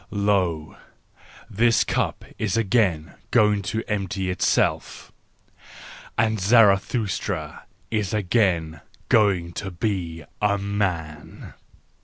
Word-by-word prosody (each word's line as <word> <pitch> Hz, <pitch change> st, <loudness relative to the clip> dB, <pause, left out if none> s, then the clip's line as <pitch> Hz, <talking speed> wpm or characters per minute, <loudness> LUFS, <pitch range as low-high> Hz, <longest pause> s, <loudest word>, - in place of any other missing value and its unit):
Lo! 95 Hz, -7 st, 0 dB, 0.7 s
This 115 Hz, +2 st, +2 dB
cup -, -, -2 dB
is 110 Hz, 0 st, 0 dB
again 95 Hz, -8 st, +1 dB, 0.2 s
going 105 Hz, -1 st, +3 dB
to 110 Hz, +3 st, -3 dB
empty 95 Hz, -3 st, -2 dB
itself, 90 Hz, -, 0 dB, 1.1 s
and 110 Hz, -1 st, +1 dB
Zarathustra 105 Hz, 0 st, +1 dB, 0.2 s
is 105 Hz, -4 st, -1 dB
again 90 Hz, -6 st, 0 dB, 0.3 s
going 95 Hz, -6 st, +2 dB
to 95 Hz, -, -5 dB
be 90 Hz, -4 st, -3 dB, 0.2 s
a 105 Hz, -1 st, +2 dB
man." 95 Hz, -6 st, -4 dB
100 Hz, 90 wpm, -23 LUFS, 90-105 Hz, 1.1 s, going